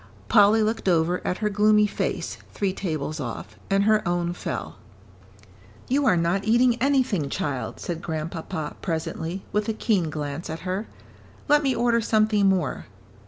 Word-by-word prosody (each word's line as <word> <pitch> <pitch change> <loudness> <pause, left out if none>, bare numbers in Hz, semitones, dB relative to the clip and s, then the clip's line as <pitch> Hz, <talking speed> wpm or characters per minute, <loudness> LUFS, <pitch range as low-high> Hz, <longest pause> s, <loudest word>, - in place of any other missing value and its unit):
Polly 215 0 +6
looked 220 -2 0
over 170 +1 +2
at 180 - -1
her - - +3
gloomy 210 +1 +4
face, 205 - -3
three 195 -2 -1
tables 155 -5 -3
off, 115 -4 -6
and 195 0 +3
her 215 0 +4
own 175 0 0
fell. - - -5 1.1
"You 275 +2 +2
are 180 - +4
not 170 +4 +1
eating 240 +2 +3
anything, 255 - +1
child," 135 -5 -3
said 170 -1 -4
Grandpapa, 160 0 -4
presently, 165 +1 -3
with 210 +1 0
a - - +1
keen 200 -7 0
glance 150 +2 -5
at 160 +1 -5
her. 190 +4 -3 0.6
"Let 295 0 +5
me 270 -3 +1
order 235 -1 +2
something 215 -2 +3
more." 180 -10 -1
195 Hz, 155 wpm, -25 LUFS, 165-215 Hz, 1.1 s, Polly